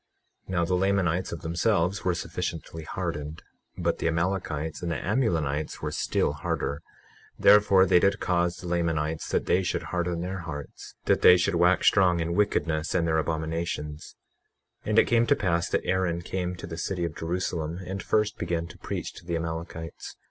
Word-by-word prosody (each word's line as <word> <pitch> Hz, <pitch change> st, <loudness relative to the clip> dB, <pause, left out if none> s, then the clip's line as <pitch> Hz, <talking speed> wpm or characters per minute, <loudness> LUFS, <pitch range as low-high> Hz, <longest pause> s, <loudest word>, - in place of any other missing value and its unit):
21:3 -, -, -21 dB
Now 85 Hz, -1 st, +2 dB
the 90 Hz, -, -1 dB
Lamanites 95 Hz, -1 st, +1 dB
of 85 Hz, -, -6 dB
themselves 85 Hz, +3 st, +1 dB
were 90 Hz, -2 st, +1 dB
sufficiently 80 Hz, -1 st, -4 dB
hardened, 75 Hz, +1 st, -4 dB, 0.3 s
but -, -, 0 dB
the -, -, 0 dB
Amalekites 80 Hz, -2 st, -1 dB
and 85 Hz, -1 st, -2 dB
the -, -, -1 dB
Amulonites 80 Hz, -, 0 dB
were -, -, -1 dB
still -, -, 0 dB
harder; 70 Hz, -, -3 dB, 0.6 s
therefore 100 Hz, -2 st, +6 dB
they 90 Hz, -1 st, +5 dB
did 100 Hz, +2 st, +2 dB
cause 85 Hz, -1 st, +1 dB
the 90 Hz, -, -9 dB
Lamanites 80 Hz, -2 st, -1 dB
that -, -, 0 dB
they 90 Hz, -, +3 dB
should 90 Hz, -, -2 dB
harden 90 Hz, -1 st, -1 dB
their 95 Hz, +2 st, -3 dB
hearts, 75 Hz, -4 st, -8 dB
that -, -, +3 dB
they 90 Hz, -, +8 dB
should 90 Hz, +2 st, +1 dB
wax 90 Hz, +2 st, +3 dB
strong 90 Hz, -4 st, +5 dB
in 85 Hz, +1 st, -1 dB
wickedness 80 Hz, -5 st, 0 dB
and 85 Hz, -2 st, +2 dB
their 80 Hz, -1 st, +2 dB
abominations. 80 Hz, -1 st, -3 dB, 0.7 s
21:4 -, -, -4 dB
And 110 Hz, -, +1 dB
it -, -, +7 dB
came 120 Hz, 0 st, +3 dB
to -, -, +5 dB
pass 85 Hz, -3 st, 0 dB
that -, -, 0 dB
Aaron 90 Hz, -2 st, 0 dB
came 90 Hz, 0 st, -3 dB
to 90 Hz, -, -8 dB
the 80 Hz, -1 st, -7 dB
city 90 Hz, 0 st, -2 dB
of 80 Hz, -, -5 dB
Jerusalem, 85 Hz, -1 st, -2 dB
and 95 Hz, +1 st, -4 dB
first 105 Hz, +2 st, 0 dB
began 85 Hz, -1 st, -1 dB
to -, -, -13 dB
preach -, -, -4 dB
to -, -, -12 dB
the 85 Hz, -, -1 dB
Amalekites. 80 Hz, 0 st, -5 dB
85 Hz, 185 wpm, -27 LUFS, 80-95 Hz, 0.7 s, they